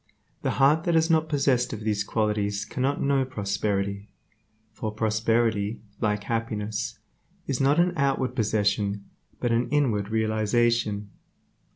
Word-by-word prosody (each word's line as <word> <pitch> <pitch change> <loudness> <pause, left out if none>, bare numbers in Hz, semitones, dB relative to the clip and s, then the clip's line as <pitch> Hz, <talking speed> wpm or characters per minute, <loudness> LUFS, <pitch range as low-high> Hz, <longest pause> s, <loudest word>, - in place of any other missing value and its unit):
The - - -1
heart 145 +4 +4
that 170 - +2
is 160 +1 +3
not 160 -1 +2
possessed 135 -5 +1
of 110 - -6
these 105 -2 0
qualities 105 -1 -1
cannot 135 +5 -1
know 140 -1 +2
prosperity, 100 -3 -2 0.6
for 110 0 -4
prosperity, 110 0 0 0.2
like 105 -1 0
happiness, 110 -2 -3 0.5
is 135 -1 -1
not 140 +4 +3
an 175 +1 +3
outward 135 -4 0
possession, 105 -3 0 0.3
but 120 - 0
an 120 +1 +1
inward 120 -8 +1
realization. 110 -1 +1
110 Hz, 130 wpm, -26 LUFS, 105-135 Hz, 0.6 s, heart